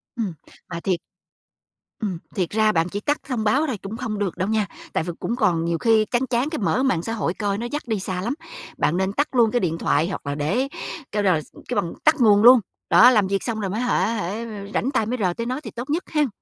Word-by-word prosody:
Ừm, 215 -8 -2 0.4
mà 170 -1 -4
thiệt 180 -1 0 1.0
Ừm, 195 -6 -2 0.2
thiệt 185 -4 0
ra 215 0 +3
bạn 165 0 +1
chỉ 205 - -3
tắt 290 +6 0
thông 245 -6 -1
báo 275 +9 +2
thôi 250 - -2
cũng 210 +3 -6
không 220 -5 -3
được 195 -4 -2
đâu 185 +4 -1
nha, 215 -3 +1 0.3
tại - - +1
vì 175 +1 -4
cũng 235 - -2
còn 175 -9 +1
nhiều 170 0 0
khi 220 +2 +3
chán 245 +3 0
chán 250 +4 +1
cái 310 - -3
mở 250 +6 +1
mạng 190 -11 +2
xã 225 - -3
hội 195 -6 -1
coi 200 -1 -1
nó 235 - -4
dắt 295 - -2
đi 220 -3 0
xa 185 -1 -3
lắm. 235 +7 -1 0.4
Bạn 170 - +1
nên 190 +1 0
tắt 290 +6 +1
luôn 230 -3 +5
cái 245 - +2
điện 165 -3 -1
thoại 160 0 +1
hoặc 190 - -5
là 140 - -1
để 195 - 0 0.4
kêu 205 0 0
là 180 -5 +3
s - - -15 0.2
kêu - - -1
bằng 170 - -5
tắt 310 - +5
nguồn 210 -2 +6
luôn. 250 0 +9 0.3
Đó, 245 - +8
làm 210 -5 +3
việc 195 0 -1
xong 225 -3 -2
rồi 195 -2 -2
mới 215 +5 -2
hả 250 - +2
hả, 210 -6 -2
ơ, 225 +4 -4 0.3
rảnh 265 - 0
tay 255 -6 +1
mới 250 +3 -2
rờ 180 -2 +2
tới 230 - -4
nó 255 +4 -2
thì - - -7
tốt 240 +3 -7
nhất 325 +5 0
hen. 300 -2 +2
215 Hz, 265 wpm, -23 LUFS, 185-245 Hz, 1.0 s, luôn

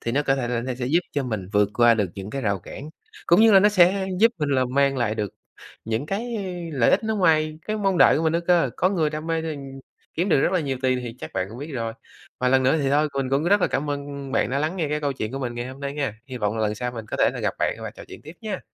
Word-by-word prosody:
thì 115 - -3
nó 145 - +2
có 135 -2 +2
thể 125 -3 -2
là 120 -1 -1
nó 125 +1 -3
sẽ 125 0 -4
giúp 160 +7 +3
cho 145 - 0
mình 110 -8 -4
vượt 105 -1 +3
qua 120 -1 +5
được 105 -5 -1
những 95 +1 -7
cái 135 +2 -4
rào 100 -3 0
cản 140 - -9 0.4
cũng 170 +4 +5
như 225 0 +6
là 195 - +8
nó 205 - +6
sẽ 190 -1 +4
giúp 230 +1 +6
mình 150 -2 -1
là 130 -2 +2
mang 135 +2 +1
lại 120 -4 0
được 105 -3 -4 0.5
những 115 +5 -2
cái 230 +6 -3 0.4
lợi 130 -5 +3
ích - - +2
nó 220 0 -1
ngoài 155 -4 +2
cái 215 - -1
mong 195 -4 0
đợi - - +6
của 160 - -1
mình 160 - +2
nữa 170 - +1
cơ. 170 -7 +3
Có 185 - +3
người 160 -6 +1
đam 155 +1 -5
mê, 165 -1 -1
ừm, 160 -2 -4 0.6
kiếm 175 +4 0
được 145 - +4
rất - - +1
là 185 - +2
nhiều 135 -4 -3
tiền 130 -1 +2
thì 120 -2 -6
chắc - - -8
bạn 95 - -1
cũng 115 +4 -10
biết 145 +3 -7
rồi. 115 -3 -3 0.5
Và 125 - +1
lần 130 0 +4
nữa 135 +5 +3
thì 135 - +1
thôi 150 +2 +3
mình 135 -2 -2
cũng 140 +3 +1
rất 200 +4 +4
là - - +3
cảm 145 +2 -2
ơn 140 -1 -5
bạn - - +1
đã 135 - 0
lắng 155 +5 -1
nghe 160 -5 -1
cái 150 +1 -1
câu 145 -2 -1
chuyện 110 -3 -5
của 135 - -3
mình 125 -3 -4
ngày 120 +1 -4
hôm 130 +1 -10
nay 140 0 -3
nghe. 140 -7 -2
Hy 130 -2 -7
vọng 105 0 -1
là 110 - 0
lần 105 0 0
sau 125 +2 -3
mình 115 -2 -7
có - - -4
thể - - +3
là - - -5
gặp - - -1
bạn - - 0
và - - -5
trò - - -12
chuyện - - -11
tiếp 155 +4 -11
nha. 210 -4 -4
140 Hz, 315 wpm, -24 LUFS, 125-165 Hz, 0.6 s, là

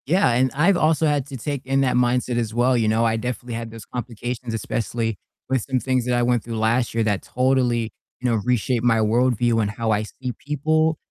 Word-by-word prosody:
Yeah, 165 -4 +3
and 125 +2 +2
I've 175 +6 +4
also 160 0 +2
had 145 -3 +1
to 135 - -7
take 140 +2 -4
in 135 +1 +1
that 130 -2 +1
mindset 125 0 +1
as 115 -2 -1
well, 125 +2 +3
you 115 -2 +2
know, 110 +2 +2
I 115 0 +1
definitely 125 +1 -4
had 115 0 -4
those 115 -1 -10
complications, 120 0 -5
especially 115 0 -2 0.3
with 130 -2 +1
some 130 -1 +1
things 130 -1 0
that 125 0 +1
I 120 - +2
went 120 -2 +1
through 115 -1 -5
last 115 +2 +1
year 115 - +2
that 105 -3 0
totally, 125 -3 +1 0.3
you 125 - -1
know, 115 - +2
reshaped 125 0 0
my 120 -2 +4
worldview 115 +1 +2
and 105 - 0
how 110 +1 -2
I 105 0 +1
see 125 +3 -6
people 155 +2 +1
120 Hz, 220 wpm, -22 LUFS, 115-130 Hz, 0.3 s, I've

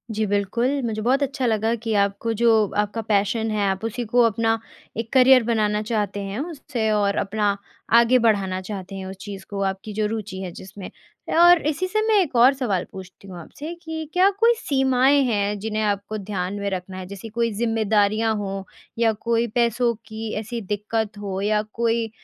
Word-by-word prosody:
जी 215 0 0
बिल्कुल। 235 +7 0
मुझे 215 -2 -2
बहुत 260 +5 +2
अच्छा 270 -1 -2
लगा 225 0 +1
कि 225 -2 -1
आपको 200 +3 -2
जो 235 -1 +5 0.3
आपका 210 +2 -5
पैशन 215 +2 +1
है 210 -1 0
आप 190 +2 -3
उसी 235 +2 -3
को 245 - +5
अपना 225 0 +2 0.4
एक 230 0 -4
करियर 260 -1 +7
बनाना 210 -2 +1
चाहते 205 -2 -1
हैं 215 - -4
उससे 280 -8 -3
और 205 -1 +1
अपना 205 0 0 0.4
आगे 240 +2 +4
बढ़ाना 200 -5 +1
चाहते 190 0 -7
हैं 190 -1 -6
उस 190 +1 -7
चीज़ 200 -2 -8
को 200 -1 -4
आपकी 195 +2 -9
जो 215 0 0
रूचि 210 -3 -5
है 185 -2 -5
जिसमें। 190 +2 -10 0.4
ए, - - -1
और 345 0 +7
इसी 320 +5 -1
से 430 +3 0
मैं 435 -2 +4
एक 310 -8 -3
और 245 +3 +6
सवाल 220 -10 -1
पूछती 190 +1 -11
हूँ 185 -2 -9
आपसे 295 - -8
कि 320 -2 -5
क्या 370 +2 +5
कोई 465 +1 +5
सीमाएँ 270 - +3
हैं 205 -3 0
जिन्हें 215 +1 -2
आपको 205 +1 -2
ध्यान 190 -2 -4
में 200 0 -2
रखना 185 0 -5
है? 185 - -6
जैसे 200 +4 -9
कोई 230 +1 -1
ज़िम्मेदारियाँ 220 0 +1
हो, 195 -2 -4 0.3
या 230 -1 +4
कोई 230 +2 0
पैसों 235 0 +2
की 220 0 -6
ऐसी 230 +2 -5
दिक्कत 210 +1 -3
हो 195 -2 -4
या 210 +1 +2
कोई 230 -1 0
220 Hz, 190 wpm, -23 LUFS, 200-235 Hz, 0.4 s, करियर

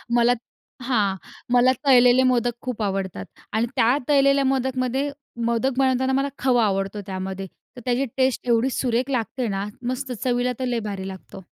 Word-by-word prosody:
मला 240 0 +4
त - - -5 0.5
हां. 215 -6 +1 0.4
मला 250 +1 +5
तळलेले 250 -1 +6
मोदक 245 -2 +2
खूप 250 -4 -4
आवडतात 190 - -3 0.3
आणि 220 +2 +2
त्या 250 +1 +3
तळलेल्या 275 -1 +4
मोदकमध्ये 265 +1 0 0.4
मोदक 245 +3 0
बनवताना 260 0 +2
मला 275 +1 +1
खवा 245 -3 +3
आवडतो 195 +1 -1
त्यामध्ये. 190 0 -5 0.3
तर 245 - -9
त्याची 250 +2 +1
टेस्ट 260 -1 +1
एवढी 235 +2 +3
सुरेख 250 0 -1
लागते 250 0 -1
ना. 195 -1 -2 0.2
मस्त! 255 +1 -3
चवीला 245 0 +1
तर 260 - -1
लय 245 -2 0
भारी 190 -1 -5
लागतो. 190 0 -9
245 Hz, 160 wpm, -23 LUFS, 220-260 Hz, 0.5 s, तळलेले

